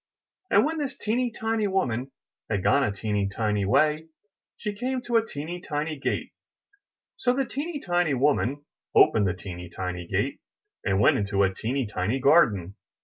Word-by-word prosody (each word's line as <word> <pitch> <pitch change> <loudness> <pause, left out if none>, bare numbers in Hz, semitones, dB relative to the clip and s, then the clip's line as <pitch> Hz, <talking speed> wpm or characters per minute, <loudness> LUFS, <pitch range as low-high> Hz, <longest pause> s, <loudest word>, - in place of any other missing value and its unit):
And - - +5
when 320 +1 -2
this 280 -2 -3
teeny 240 +3 0
tiny 225 -1 -1
woman 135 - -1 0.4
had 100 -4 -1
gone 140 - +4
a 105 - +1
teeny 100 -1 -1
tiny 105 -1 0
way, 155 +9 +2 0.5
she 210 -2 -3
came 255 +5 -2
to 240 -1 +2
a 225 - +3
teeny 175 -2 -6
tiny 155 0 -3
gate; - - -2 0.9
so 245 - +2
the 270 0 +1
teeny 290 +5 -4
tiny 175 - +1
woman 145 +1 +1 0.3
opened 105 -3 +5
the 90 - -1
teeny 90 -2 -8
tiny 90 -1 -5
gate, - - -1 0.4
and 95 0 +1
went 105 - +5
into 100 -1 +1
a 95 -1 +2
teeny 125 +6 -2
tiny 105 +4 -1
garden. 105 - +3
140 Hz, 165 wpm, -26 LUFS, -, 0.9 s, And